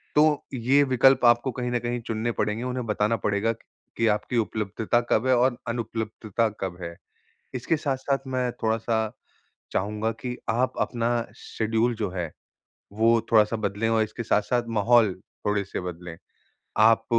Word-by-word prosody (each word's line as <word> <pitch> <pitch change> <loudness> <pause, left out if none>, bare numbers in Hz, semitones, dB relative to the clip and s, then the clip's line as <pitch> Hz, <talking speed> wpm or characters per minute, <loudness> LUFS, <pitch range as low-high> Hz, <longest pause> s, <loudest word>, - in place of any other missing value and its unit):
तो 150 0 +4
ये 130 +3 +3
विकल्प 130 -1 +4
आपको 120 +2 +4
कहीं 125 +1 -3
न 120 - +1
कहीं 120 +1 -2
चुनने 115 +1 -1
पड़ेंगे, 110 +1 -1
उन्हें 125 -1 -3
बताना 105 +1 +1
पड़ेगा 105 +2 0 0.5
कि 115 - +2
आपकी 105 +3 0
उपलब्धता 110 +1 0
कब 115 +4 +3
है 130 - +5
और 125 0 +2
अनुपलब्धता 115 -1 -2
कब 95 -2 -3
है। 85 -1 -6 0.6
इसके 130 +6 0
साथ-साथ 135 -1 -1
मैं 130 -1 -1
थोड़ा-सा 110 +1 +1 0.8
चाहूँगा 105 +3 -1
कि 125 -1 -4
आप 125 +3 +1
अपना 120 -1 0 0.3
शेड्यूल 115 +2 -1
जो 105 -3 -2
है, 90 -3 -4 0.6
वो 115 +2 +4
थोड़ा-सा 110 0 +5
बदलें 105 +1 -1
और 115 -1 +3
इसके 110 +2 -6
साथ-साथ 120 +2 +1
माहौल 110 -2 +4 0.3
थोड़े-से 100 -2 -1
बदलें। 90 -1 -7 0.6
आप 115 +1 +5
115 Hz, 145 wpm, -26 LUFS, 105-125 Hz, 0.8 s, है